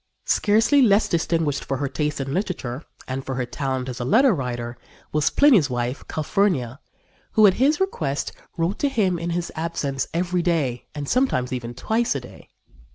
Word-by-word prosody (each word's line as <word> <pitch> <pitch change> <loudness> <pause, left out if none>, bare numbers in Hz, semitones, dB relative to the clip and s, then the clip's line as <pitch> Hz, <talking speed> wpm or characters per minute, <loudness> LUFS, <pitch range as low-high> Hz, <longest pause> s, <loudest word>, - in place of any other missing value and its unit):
" - - -50
Scarcely 225 +7 +3
less 215 -3 +4
distinguished 165 -4 0
for 135 - -2
her 140 +1 -1
taste 150 +2 -2
in 135 0 -3
literature, 160 - -3 0.3
and 130 +1 -3
for 130 - -4
her 125 0 -1
talent 130 0 -3
as 125 -1 -5
a - - -2
letter 235 - +4
writer, 120 -5 -4 0.4
was 150 -1 +2
Pliny's 235 - +5
wife, 125 +2 -2
Calphurnia, 155 - 0 0.5
who, 215 - +6
at 195 - +6
his 295 +3 +4
request, 150 - -1 0.3
wrote 170 +4 -1
to 285 - +2
him 195 -9 +1
in 170 +1 -3
his 170 0 -2
absence 155 -5 -2
every 175 +1 0
day 150 -9 -1
and 145 -1 -4
sometimes 140 - +1
even 120 -1 -5
twice 225 - 0
a - - 0
day. 125 - -14
155 Hz, 180 wpm, -23 LUFS, 130-195 Hz, 0.5 s, who